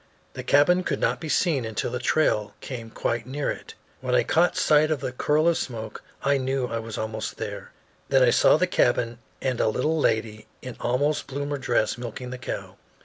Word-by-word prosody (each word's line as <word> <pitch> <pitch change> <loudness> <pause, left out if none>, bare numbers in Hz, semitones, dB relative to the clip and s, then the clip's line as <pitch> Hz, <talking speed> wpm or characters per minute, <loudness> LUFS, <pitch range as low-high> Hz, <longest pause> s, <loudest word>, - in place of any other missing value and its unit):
The - - -5
cabin 180 +6 +4
could - - -2
not - - +1
be 160 - -5
seen 145 -3 +2
until 110 -2 -3
the 125 - -2
trail 105 -7 +1
came 115 -4 -7
quite 115 +1 -2
near 140 +2 -2
it. - - -9 0.2
When - - 0
I - - +4
caught 175 +2 +2
sight 150 0 +4
of 150 -4 -1
a 130 - -2
curl 150 +5 +1
of 170 - +3
smoke 110 -4 -5 0.2
I 140 0 +3
knew 130 0 -1
I 115 -1 -3
was 115 -1 -6
almost 110 0 -4
there. - - -6 0.4
Then 135 -1 +5
I 120 - +5
saw - - +5
the 185 - +3
cabin 120 -8 +1 0.2
and 130 -3 0
a - - +3
little 150 +9 0
lady 110 -4 0 0.2
in 125 -1 -6
almost 145 +5 0
bloomer 145 +1 -3
dress 120 -2 0
milking 125 +1 -6
the 130 - -6
cow. 130 - -6
130 Hz, 200 wpm, -25 LUFS, 115-145 Hz, 0.4 s, Then